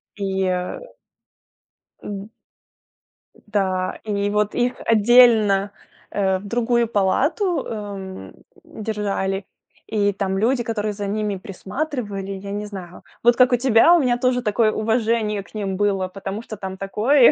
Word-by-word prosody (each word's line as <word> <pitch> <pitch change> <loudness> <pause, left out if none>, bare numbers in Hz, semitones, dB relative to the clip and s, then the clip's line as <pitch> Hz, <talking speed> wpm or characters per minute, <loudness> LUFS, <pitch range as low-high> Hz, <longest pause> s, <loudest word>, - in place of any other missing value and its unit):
И 195 -2 -1 1.6
М. 200 +1 -6 1.1
Да. 190 -3 -2
И 205 -1 -1
вот 210 0 0
их 245 +1 +1
отдельно, 220 -3 +5 0.4
э, 190 -2 +1
в 205 - -12
другую 235 +1 +1
палату, 290 - +1
эм, 200 -3 -7 0.3
держали. 200 -3 -3 0.4
И 205 -2 +1
там 195 0 -2
люди, 240 +5 +2
которые 215 -2 -2
за 200 0 -4
ними 210 -1 -1
присматривали, 200 0 -5
я 200 +1 -6
не 205 +1 -3
знаю. 185 -4 -9 0.2
Вот 240 0 +5
как 250 0 +5
у - - +5
тебя, 245 +7 +5
у - - +4
меня 245 -3 +2
тоже 250 0 +1
такое 215 +1 +2
уважение 220 -2 0
к - - -18
ним 195 -3 -2
было, 195 -2 +1
потому 195 +3 -6
что 215 - -8
там 190 -1 -6
такое 225 +7 +4
210 Hz, 135 wpm, -22 LUFS, 195-235 Hz, 1.6 s, отдельно